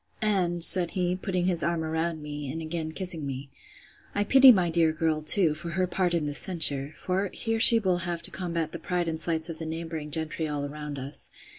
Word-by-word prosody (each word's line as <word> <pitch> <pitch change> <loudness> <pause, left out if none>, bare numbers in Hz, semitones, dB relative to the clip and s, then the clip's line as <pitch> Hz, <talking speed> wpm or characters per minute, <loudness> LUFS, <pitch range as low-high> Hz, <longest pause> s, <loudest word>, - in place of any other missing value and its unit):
And, 180 -5 +2
said 175 -1 +8
he, 180 0 -1
putting 185 -1 -3
his 175 -2 0
arm 170 -1 -2
round 160 0 -4
me, 145 -2 -7
and 160 - -6
again 160 0 -6
kissing 180 -2 -2
me, 135 0 -7 0.6
I 205 - 0
pity 265 +4 +7
my 180 -6 0
dear 165 -1 +1
girl 155 -1 -2
too, 160 +1 +3
for 155 +2 -7
her 185 +2 -1
part 180 -1 -2
in 160 -3 -2
this 145 -1 +2
censure; 145 -6 +3
for, 190 +2 -3
here 225 -1 -2 0.2
will 180 -2 0
she 175 - -6
have 170 -1 -5
to - - +7
combat 170 -3 -4
the 170 - -7
pride 175 +1 -3
and 160 -1 -4
slights 160 -1 -1
of 165 -2 -8
the 160 - -6
neighbouring 160 -1 -7
gentry 160 +1 -3
all 145 -1 -4
around 150 0 -8
us. 135 +2 -4
165 Hz, 220 wpm, -26 LUFS, 155-180 Hz, 0.6 s, said